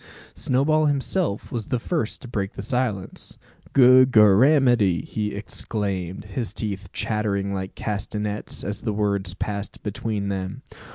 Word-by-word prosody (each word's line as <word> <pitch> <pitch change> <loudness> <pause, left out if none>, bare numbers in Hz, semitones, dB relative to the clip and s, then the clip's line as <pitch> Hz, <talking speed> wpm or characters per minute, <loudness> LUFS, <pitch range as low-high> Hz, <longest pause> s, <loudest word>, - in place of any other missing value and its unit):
Snowball 155 +4 +2
himself 145 - -1
was 115 -3 -3
the 125 - 0
first 135 -1 -2
to - - -8
break 100 -5 -3
silence. 105 -3 -3 0.3
"Good 130 0 +7
Gorramity!" 110 - +5
he 105 -2 -3
exclaimed, 100 -3 -3
his 105 +3 -4
teeth 100 -3 -3
chattering 100 -2 -1
like 95 -1 -4
castanets, 105 0 -3
as 105 +2 -4
the 110 - -2
words 100 -3 -1
passed 100 +1 -4
between 105 -1 -3
them. 95 -1 -4
105 Hz, 125 wpm, -24 LUFS, 100-125 Hz, 0.3 s, Good